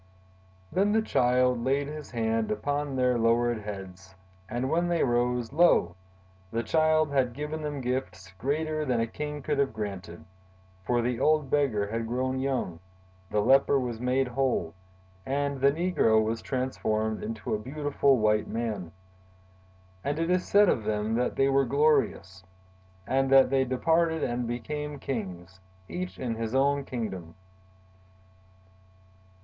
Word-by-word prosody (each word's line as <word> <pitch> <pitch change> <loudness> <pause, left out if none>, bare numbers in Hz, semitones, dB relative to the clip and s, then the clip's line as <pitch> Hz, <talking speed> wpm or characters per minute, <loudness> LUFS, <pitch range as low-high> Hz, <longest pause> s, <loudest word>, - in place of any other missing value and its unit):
"Then 200 +2 +2
the 220 - +3
Child 125 - +2
laid 135 +2 +1
his 150 -1 -7
hand 115 -1 -1
upon 145 +6 -2
their 125 -2 +2
lowered 115 0 +2
heads, 95 -3 -9 0.3
and 120 +2 -2
when 170 +4 +1
they 170 -1 +1
rose, 120 -1 0
lo! 165 - +4 0.5
the 115 +3 -2
Child 155 +2 +2
had 130 -3 +1
given 150 +4 -5
them 145 -2 -4
gifts 120 -8 -4
greater 155 +4 -1
than 125 -5 0
a 115 - +2
king 150 +5 -6
could 145 0 -1
have 140 -4 +1
granted; 95 -6 -6 0.6
for 120 -1 +2
the 125 0 -1
old 150 -1 +2
beggar 130 -9 +2
had 115 +2 -3
grown 130 +2 -1
young, 130 -11 -2 0.5
the 105 - +1
leper 135 +4 +4
was 120 -3 -4
made 125 +1 +1
whole, 125 -10 -1 0.5
and 140 +1 -2
the 140 +1 +5
negro 155 -9 +2
was 110 +1 -1
transformed 110 -5 -2
into 110 0 -4
a 105 - 0
beautiful 140 +2 +1
white 105 -1 +2
man. 105 -7 -3 1.1
And 145 +1 -1
it 165 +2 0
is 180 0 +1
said 205 0 +5
of 115 - +1
them 105 +1 -1
that 125 +2 0
they 135 - +3
were 135 0 +3
glorious! 140 -9 +1 0.6
and 135 +4 +1
that 135 -1 +6
they 135 -1 +3
departed 160 +5 +1
and 120 0 -1
became 150 +5 -4
kings—each 95 - -7
in 125 -3 -3
his 115 +2 -3
own 140 +1 +2
kingdom." 95 -10 -5
125 Hz, 145 wpm, -28 LUFS, 110-145 Hz, 1.1 s, that